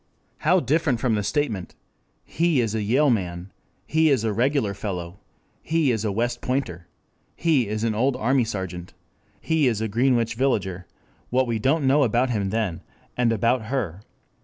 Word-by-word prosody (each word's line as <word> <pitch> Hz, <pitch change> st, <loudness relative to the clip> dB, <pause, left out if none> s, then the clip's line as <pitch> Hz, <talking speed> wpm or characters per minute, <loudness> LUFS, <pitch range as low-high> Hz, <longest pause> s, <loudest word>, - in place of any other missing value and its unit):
How 180 Hz, +5 st, +3 dB
different 145 Hz, -3 st, +1 dB
from 120 Hz, -1 st, +1 dB
the 105 Hz, -, +1 dB
statement: 110 Hz, -, -2 dB, 0.5 s
he 165 Hz, -3 st, +1 dB
is 115 Hz, -3 st, 0 dB
a 110 Hz, -, -1 dB
Yale 130 Hz, +7 st, +3 dB
Man. 90 Hz, -3 st, -3 dB, 0.3 s
He 160 Hz, 0 st, +3 dB
is 130 Hz, -6 st, +2 dB
a 110 Hz, -2 st, 0 dB
regular 125 Hz, -2 st, +1 dB
fellow. 95 Hz, -2 st, -5 dB, 0.4 s
He 160 Hz, -4 st, +1 dB
is 110 Hz, -3 st, -1 dB
a 105 Hz, -, 0 dB
West 120 Hz, +4 st, -1 dB
Pointer. 105 Hz, -10 st, -3 dB, 0.5 s
He 150 Hz, -9 st, +2 dB
is 110 Hz, +1 st, -3 dB
an 115 Hz, -1 st, +1 dB
old 125 Hz, +5 st, +1 dB
army 125 Hz, +2 st, +2 dB
sergeant. 95 Hz, -5 st, -6 dB, 0.4 s
He 160 Hz, -4 st, +1 dB
is 115 Hz, -4 st, 0 dB
a 110 Hz, -, -1 dB
Greenwich 120 Hz, +1 st, +1 dB
Villager: 100 Hz, -8 st, -1 dB, 0.4 s
what 130 Hz, +1 st, +2 dB, 0.2 s
don't 145 Hz, +7 st, +2 dB
we 135 Hz, -, 0 dB
know 140 Hz, +3 st, +4 dB
about 125 Hz, 0 st, +2 dB
him 100 Hz, -4 st, -1 dB
then, 100 Hz, -6 st, -2 dB, 0.3 s
and 120 Hz, -2 st, +2 dB
about 115 Hz, +2 st, +1 dB
her? 110 Hz, -8 st, -3 dB
115 Hz, 170 wpm, -24 LUFS, 100-135 Hz, 0.5 s, know